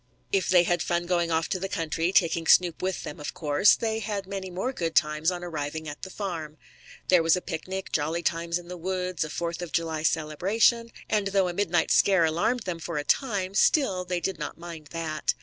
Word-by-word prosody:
If 195 -2 +1
they 180 -1 +6
had 175 -1 +1
fun 175 0 -1
going 175 -1 +1
off 160 0 +1
to 185 - -1
the 195 +1 -3
country, 165 +1 -1
taking 165 -3 +2
Snoop 175 -3 +4
with 185 0 -2
them, 150 - -7
of 145 - -6
course, 150 +5 +4
they 220 -1 -2
had 205 -2 -3
many 190 -1 -5
more 190 +9 -3
good 165 -7 -3
times 150 +2 +2
on 175 -1 -4
arriving 160 -2 -4
at 145 -1 -7
the 190 - -6
farm. 165 -6 -5 0.5
There 180 -2 +6
was 165 +1 +4
a - - -1
picnic, 185 +2 -5
jolly 160 +3 -1
times 170 0 0
in 175 -1 -11
the 180 0 -7
woods, 180 -1 -2
a 155 - -5
Fourth 170 +2 -3
of 175 -3 -6
July 160 0 -1
celebration, 190 +10 +2 0.2
and 210 -2 +1
though 195 -1 +2
a - - -4
midnight 175 -3 +1
scare 190 -4 +5
alarmed 175 +10 0
them 180 -5 -4
for 165 -1 -4
a 145 - -1
time, 200 - 0
still 200 -4 +3
they 180 -1 -2
did 190 +3 -3
not 150 - -5
mind 165 -3 -9
that. 160 -1 -2
175 Hz, 220 wpm, -27 LUFS, 160-190 Hz, 0.5 s, they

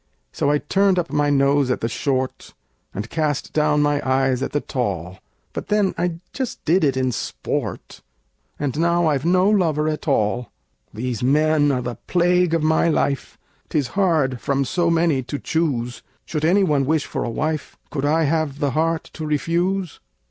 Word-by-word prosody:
So 140 - 0
I 150 - +3
turned 195 +5 +2
up 170 -1 -1
my 145 0 +2
nose 140 -1 +3
at 125 - 0
the 115 - 0
short, 130 +2 -2 0.4
And 105 +3 -5
cast 150 +1 -2
down 150 -1 +2
my 145 0 +1
eyes 130 -1 +1
at - - -2
the 145 - +1
tall; 95 - -3 0.3
But - - -5
then 210 -2 +2
I 175 -2 -2
just 260 -3 -4
did 170 +4 +3
it 135 -3 +2
in 130 -1 +1
sport 115 - -4 0.6
And 145 0 -2
now 170 +1 +2
I've 145 -2 +1
no 180 +2 +4
lover 165 -7 +2
at 155 0 -3
all! 120 -2 0 0.4
These 120 +1 -4
men 145 +2 +3
are 125 -2 -1
the 120 -1 -4
plague 180 -1 +3
of 165 - 0
my 160 +2 +3
life: 140 -4 -1 0.3
'Tis 140 -5 0
hard 160 - +1
from 140 0 0
so 170 +4 +1
many 165 -4 +2
to 130 +3 -5
choose! 135 -7 -1 0.2
Should 155 -1 -2
any 195 +5 +4
one 145 -6 +1
wish 155 -1 +1
for - - -3
a - - -2
wife, 155 +5 -3
Could 140 -2 -3
I 155 +3 +2
have 155 -2 0
the 145 -2 0
heart 160 +3 0
to 160 - -7
refuse? 170 +4 -1
150 Hz, 180 wpm, -22 LUFS, 135-165 Hz, 0.6 s, no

